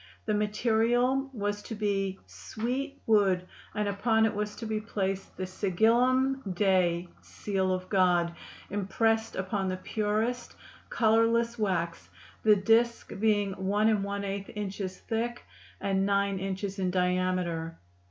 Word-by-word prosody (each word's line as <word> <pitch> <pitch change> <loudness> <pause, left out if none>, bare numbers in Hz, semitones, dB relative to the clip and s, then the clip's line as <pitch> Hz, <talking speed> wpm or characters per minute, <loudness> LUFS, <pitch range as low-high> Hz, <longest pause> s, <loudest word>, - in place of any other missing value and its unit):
The 215 - 0
material 235 +5 +2
was 205 -3 -2
to 225 - -7
be 195 -2 -1
"swete 260 +6 -4
wood" 195 -5 +3 0.3
and 210 -1 0
upon 220 +3 +2
it 220 - +1
was 210 0 -3
to 230 - -7
be 215 -1 -2
placed 195 -3 -3
the 185 - -2
Sigillum 240 +8 +2
Dei 180 -2 +2
(Seal 190 -2 -2
of 185 0 -2
God) 180 -3 +3 0.4
impressed 220 +3 0
upon 190 +1 -2
the 185 0 -2
purest, 215 +5 -2 0.3
colorless 230 +1 +2
wax, 170 -5 -1 0.3
the 215 -1 +6
disk 225 +4 +2
being 205 -2 +2
1⅛ 200 0 0
inches 195 -2 -4
thick 235 +2 -3 0.4
and 195 -1 0
9 200 -1 +1
inches 195 +1 -4
in 185 -1 +1
diameter. 180 -2 0
205 Hz, 125 wpm, -29 LUFS, 190-225 Hz, 0.4 s, the